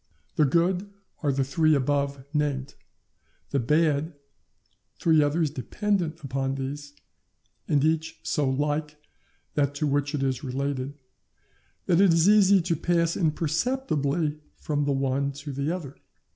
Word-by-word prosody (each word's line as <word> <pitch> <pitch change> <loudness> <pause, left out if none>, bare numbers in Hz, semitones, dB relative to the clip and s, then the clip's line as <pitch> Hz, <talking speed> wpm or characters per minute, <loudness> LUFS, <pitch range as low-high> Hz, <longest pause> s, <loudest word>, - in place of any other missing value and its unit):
The 150 - +4
good 175 +6 +1 0.3
are 145 - +1
the 135 0 +1
three 155 +3 +2
above 140 0 -1
named; 145 -2 -1 0.8
the 140 - +1
bad, 150 +4 +1 0.8
three 160 -2 +4
others 150 +1 +1
dependent 170 - -2
upon 135 0 -2
these, 145 +2 -5 0.7
and 145 -2 +2
each 160 +1 0
so 145 -3 0
like 150 +2 -1 0.6
that 145 -1 0
to 150 - -1
which 145 +1 0
it 140 - -1
is 130 -1 -1
related, 135 +1 -3 0.9
that 175 +1 +3
it 195 -3 +6
is 165 +2 +4
easy 200 -2 +6
to 170 -1 0
pass 170 +1 +1
imperceptibly 155 - 0 0.2
from 145 -1 -1
the 145 - +1
one 135 +1 0
to 145 +1 -7
the 140 +3 -2
other. 160 -7 -5
145 Hz, 135 wpm, -26 LUFS, 140-165 Hz, 0.9 s, it